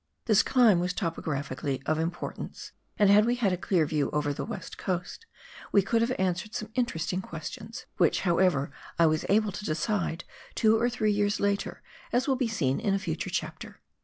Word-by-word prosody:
This 215 -4 +5
climb 235 -8 +4
was 180 +1 -1
topographically 145 -6 -3
of 155 0 +1
importance, 165 +2 -5 0.3
and 205 -1 +5
had 210 +1 +7
we 240 +2 +2
had 215 -6 +1
a - - +2
clear 180 -2 +1
view 150 -1 0
over 150 -1 0
the - - -4
West 205 -6 -6
Coast, 185 - -4 0.4
we 200 - +5
could 225 +4 +1
have 230 +2 +1
answered 190 +3 -1
some 215 0 -4
interesting 185 -7 -1
questions, 190 +6 -8
which, 170 -4 +3
however, 170 -6 +2 0.3
I 170 - +5
was 155 -1 +1
able 210 +1 +3
to 205 - -7
decide 170 0 -1 0.3
two 220 0 +4
or 235 +2 +2
three 215 -3 +1
years 205 0 +1
later, 200 -1 -1 0.3
as 245 +3 +1
will 270 - +3
be 255 -2 0
seen 150 -12 0
in 205 -3 +1
a - - +2
future 195 - -3
chapter. - - -5
195 Hz, 190 wpm, -28 LUFS, 165-220 Hz, 0.4 s, had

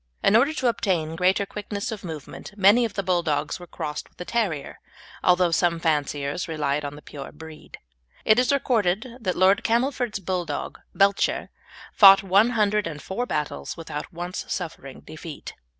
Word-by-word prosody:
In 205 - +4
order 270 +7 +5
to 260 -5 -1
obtain 175 -9 0
greater 185 +3 +2
quickness 205 +1 -5
of 215 -2 -6
movement 160 +4 -8
many 205 +5 +5
of 220 - -5
the 195 - -1
Bulldogs 165 -5 0
were 175 - -11
crossed 150 -2 -6
with - - -36
a 180 - -5
terrier, 195 -12 -2 0.4
although 180 -1 +4
some 170 0 +2
fanciers 145 0 -1
relied 150 -2 -1
on 145 0 -5
the 150 - -13
pure 140 -2 -9
breed. 160 -1 -12 0.5
It 215 +2 +5
is 250 - +2
recorded 225 -6 +1
that 185 -4 -2
Lord 190 +2 +4
Camelford's 240 -1 0
Bulldog 180 -2 -4 0.2
Belcher 200 0 +2 0.4
fought 195 -1 +8
one 195 +4 +4
hundred 210 -2 +2
and 150 -3 -6
four 215 - -4
battles 140 - -3
without 160 -3 -6
once 175 +2 -5
suffering 160 -7 -6
defeat. 155 -1 -9
180 Hz, 165 wpm, -24 LUFS, 155-210 Hz, 0.5 s, fought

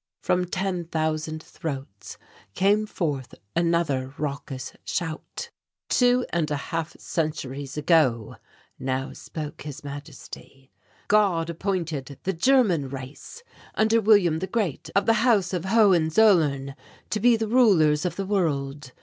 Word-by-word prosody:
From 180 0 +1
ten 180 -1 -2
thousand 155 -1 -2
throats 135 -10 -7 0.4
came 205 +3 +2
forth 145 - -3 0.2
another 165 -6 0
raucous 140 -3 -5
shout. 160 -3 -4 0.4
"Two 245 0 +3
and 165 -3 0
a 150 - 0
half 165 +3 -4
centuries 145 -3 -3
ago," 145 -8 +2 0.4
now 130 0 -2
spoke 150 -2 -7
His 145 -2 -8
Majesty, 140 -2 -10 0.4
"God 185 -6 +2
appointed 165 -7 -3
the 190 - -1
German 185 - +3
race, 135 - -9 0.3
under 220 +1 +3
William 195 -7 +4
the 190 - -3
Great, 190 - -2
of 200 0 +3
the 225 - +4
House 210 -7 +3
of 180 -1 -2
Hohenzollern, 170 -8 +4 0.4
to 215 - 0
be 240 +2 +5
the 225 -1 -2
rulers 185 -11 +4
of 180 - -2
the 195 - -3
world. 145 -8 -1
165 Hz, 125 wpm, -25 LUFS, 145-195 Hz, 0.4 s, be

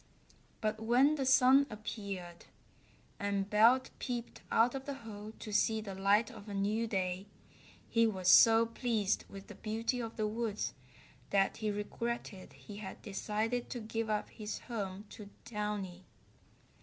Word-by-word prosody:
But 215 0 -1
when 250 +6 +4
the 275 -4 -1
sun 265 +1 +6
appeared, 200 -5 -6 0.7
and 200 -1 -1
Belt 230 +5 +5
peeped 240 -2 -4
out 235 +2 +4
of 270 -1 -5
the 280 - -4
hole 210 0 -8
to 215 - -7
see 220 +1 +3
the 210 -3 -6
light 200 +5 +3
of 215 -2 -11
a 200 - -4
new 210 +4 0
day, 190 -1 -2 0.6
he 230 0 +3
was 190 -4 -3
so 225 +4 +8
pleased 230 -3 0
with 195 0 -9
the - - -10
beauty 225 +3 -2
of 230 -1 -5
the 215 - 0
woods 220 -1 -2 0.6
that 195 -1 +2
he 215 -1 -1
regretted 210 -1 -4
he 205 - -11
had 205 -2 -7
decided 220 +4 -2
to 245 - -4
give 225 0 -3
up 210 -1 -1
his 215 -1 -5
home 205 -4 -5
to 205 -2 -10 0.2
Downy. 205 -4 -4
215 Hz, 155 wpm, -33 LUFS, 200-230 Hz, 0.7 s, so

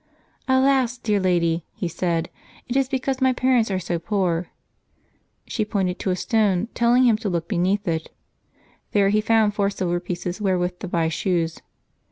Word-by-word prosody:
"Alas! 260 -2 +3
dear 210 -4 0
Lady," 170 -3 +1
he 180 - -3
said, 170 -1 -2 0.4
"it 245 - -3
is 270 -1 +2
because 265 0 -2
my 260 0 +4
parents 255 -3 +2
are 190 - 0
so 175 -2 -2
poor." 180 -3 -1 1.0
She 220 - -2
pointed 190 -4 -1
to - - -2
a 180 - +1
stone, 210 0 +1
telling 240 +2 +3
him 235 -4 +4
to 215 -2 -3
look 170 -2 -2
beneath 195 +3 0
it; 160 -1 -2 0.8
there 200 -1 +4
he 210 +1 +2
found 220 -1 +3
four 200 -1 +1
silver 175 -3 -1
pieces 175 +2 -5
wherewith 180 -2 0
to - - -5
buy 170 -2 0
shoes. 165 0 -1
195 Hz, 170 wpm, -23 LUFS, 175-225 Hz, 1.0 s, my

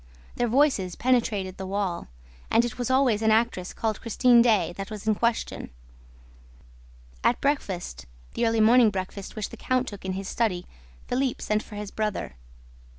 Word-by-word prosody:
Their 240 - +1
voices 235 - +2
penetrated 220 -7 0
the 190 - -5
wall; 195 -3 -2 0.4
and 230 +1 +4
it 240 0 -6
was 245 - -1
always 260 -5 +3
an 220 - +3
actress 220 -5 +1
called 220 -2 -2
Christine 240 +1 +4
Daae 210 -8 +3
that 195 +2 -6
was 215 -2 -7
in 215 - +4
question. 235 +2 -1 1.5
At 240 - +3
breakfast 190 - -2 0.3
the 235 - +1
early 225 -1 +2
morning 230 +1 +6
breakfast, 195 0 -5
which 215 -2 -3
the - - -10
count 255 0 0
took 205 -2 -8
in 190 0 -2
his 195 0 -5
study 195 -7 -1 0.4
Philippe 255 0 -1
sent 210 0 +1
for 210 - -11
his 205 -1 -6
brother. 215 - -3
215 Hz, 165 wpm, -26 LUFS, 195-240 Hz, 1.5 s, morning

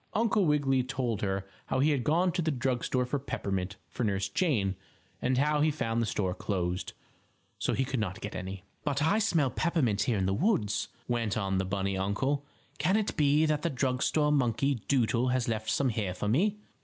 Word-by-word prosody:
Uncle 215 -3 +3
Wiggily 140 -3 +3
told 125 -4 -2
her 95 -1 -1 0.2
how - - 0
he 145 +4 +3
had 135 -4 0
gone 175 +6 +2
to 175 - -1
the 160 - 0
drug 130 -3 -1
store 125 -1 +1
for 140 +3 -2
peppermint 100 -7 -3
for - - -4
Nurse 100 -2 0
Jane, 100 - +1 0.5
and 130 0 +1
how 150 +2 +2
he 155 - +4
had 150 - -3
found 115 -2 0
the 115 - 0
store 95 -4 -1
closed, 90 -2 -2 0.7
so - - 0
he 135 - +1
could 130 -1 -2
not 95 -4 -2
get 105 - -6
any. 95 +1 -6 0.2
"But 145 0 0
I 200 +8 +3
smell 165 - +2
peppermint 140 - +1
here 120 -4 +1
in 95 - +1
the 95 - +1
woods," 110 - +1 0.2
went 115 -4 0
on 95 -2 0
the 95 - 0
bunny 95 0 -1
uncle. 135 +9 0 0.4
"Can 190 +3 +3
it 215 -1 -1
be 150 +1 +4
that 155 -1 +1
the 170 - 0
drug 130 -2 -1
store 150 -1 +2
monkey 135 -1 +1
doodle 125 -2 +2
has 125 -1 +1
left 110 -1 -2
some 135 +4 +2
here 105 -5 -2
for 100 - -3
me?" 195 - +2
125 Hz, 210 wpm, -30 LUFS, 100-150 Hz, 0.7 s, he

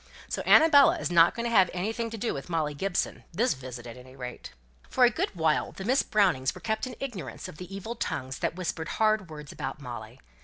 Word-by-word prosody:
So - - -3
Annabella 320 +1 +7
is 315 - -3
not 170 -1 +6
to 235 0 -2
have 195 -6 +4
anything 225 +5 -2
to 225 - -6
do 230 +2 -1
with 135 +5 -7
Molly 155 -3 0
Gibson, 180 +5 -2
this 225 +9 +1
visit 125 -3 -9
at 120 0 -9
any 130 +1 -14
rate." 125 -2 -8 0.4
For 255 - +3
a 240 - +4
good 210 - -2
while 160 -2 +1
the 190 - -7
Miss 260 +5 +3
Brownings 135 -11 +2
were - - -9
kept 220 +3 -1
in 250 - -7
ignorance 210 - -6
of - - -11
the 180 +2 -9
evil 195 +4 -5
tongues 130 - -4
that - - -1
whispered 165 -3 -3
hard 215 -4 +2
words 150 -2 -9
about - - -5
Molly. 120 -2 -8
180 Hz, 220 wpm, -28 LUFS, 140-225 Hz, 0.4 s, Annabella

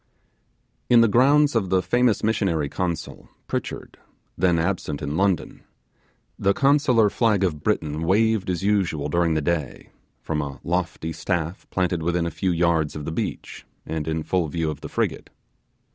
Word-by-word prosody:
In 120 -1 +7
the 115 - +5
grounds 140 +6 +4
of 105 -6 0
the 95 0 +2
famous 120 +4 +2
missionary 95 -9 0
consul, 85 0 -4 0.2
Pritchard, - - -5 0.4
then 90 -1 +2
absent 80 -4 -1
in 70 +1 -4
London, 95 -1 0 0.8
the 100 0 +2
consular 135 -6 +4
flag 105 -2 +1
of 80 -6 -1
Britain 80 -7 -1
waved 105 +3 +2
as 90 0 -2
usual 95 -8 0
during 85 0 +1
the 80 - +1
day, 80 -4 -3 0.3
from 75 -2 -1
a 70 -1 -6
lofty 85 -2 -2
staff 85 +2 -3
planted 90 -2 0
within 85 +1 0
a 85 - -2
few 95 - -2
yards 85 -3 +1
of 75 -1 -6
the 80 - -3
beach, - - -5 0.2
and 80 -1 -4
in 80 0 -1
full 90 -1 0
view 80 0 -2
of 75 - -9
the - - -7
frigate. - - -2
90 Hz, 160 wpm, -23 LUFS, 80-100 Hz, 0.8 s, In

